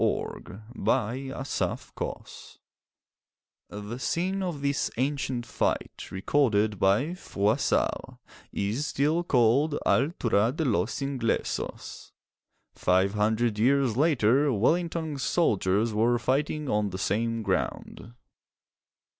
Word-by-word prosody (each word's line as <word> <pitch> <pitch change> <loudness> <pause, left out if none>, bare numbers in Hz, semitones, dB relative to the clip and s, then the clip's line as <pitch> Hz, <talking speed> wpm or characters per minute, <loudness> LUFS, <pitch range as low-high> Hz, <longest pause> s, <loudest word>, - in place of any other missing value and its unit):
A - - +4
FORGOTTEN 125 +5 -2
TALE - - -3 1.5
[The 105 +4 -7
scene 185 +8 -1
of 175 -6 -3
this 140 0 0
ancient 130 -2 -1
fight, - - -2
recorded 105 -1 +1
by 105 - +2
Froissart, 105 - -1 0.3
is 110 +9 -2
still 150 +5 +1
called 140 +2 +3
'Altura 120 - +2
de 160 - -1
los 105 0 0
Inglesos.' 135 -4 -3 0.6
Five 95 +2 +2
hundred 110 +1 +1
years 130 0 +3
later 140 -1 +3
Wellington's 160 - 0
soldiers 105 - +1
were 115 +3 +2
fighting 145 +5 -1
on 105 -3 +1
the 95 - -5
same 115 +4 -1
ground. 110 +3 -3
120 Hz, 95 wpm, -27 LUFS, 105-145 Hz, 1.5 s, A